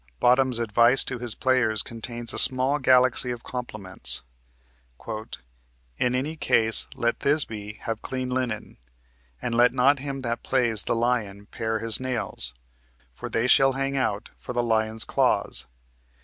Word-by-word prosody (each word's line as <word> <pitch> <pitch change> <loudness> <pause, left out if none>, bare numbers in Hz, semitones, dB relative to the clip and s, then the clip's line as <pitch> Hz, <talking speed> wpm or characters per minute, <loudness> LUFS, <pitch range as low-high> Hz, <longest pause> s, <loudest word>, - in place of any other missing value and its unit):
Bottom's 125 0 +3
advice 120 +3 +4
to 125 - -5
his 120 -3 -4
players 120 -5 +1
contains 115 0 -5
a - - +1
small 130 +3 +4
galaxy 130 -1 +3
of 120 -1 -5
compliments: 95 - -4 0.8
"In 60 - -6
any 145 +5 -2
case 110 -7 +2
let 115 0 -1
Thisby 110 -8 -1
have 115 -1 -4
clean 130 -1 -4
linen, 125 -4 -3 0.7
and 120 - -2
let 120 +1 +4
not 140 +3 +3
him 135 0 -5
that 115 -2 -3
plays 120 -5 +1
the - - 0
lion 115 -4 -1
pare 110 0 -2
his 115 -1 +2
nails, 120 - -3 0.6
for - - -7
they 115 - 0
shall 135 +1 +5
hang 135 +1 -2
out 110 -6 -2
for - - -7
the 120 0 0
lion's 110 -1 0
claws. - - +1
120 Hz, 145 wpm, -25 LUFS, 110-130 Hz, 0.8 s, shall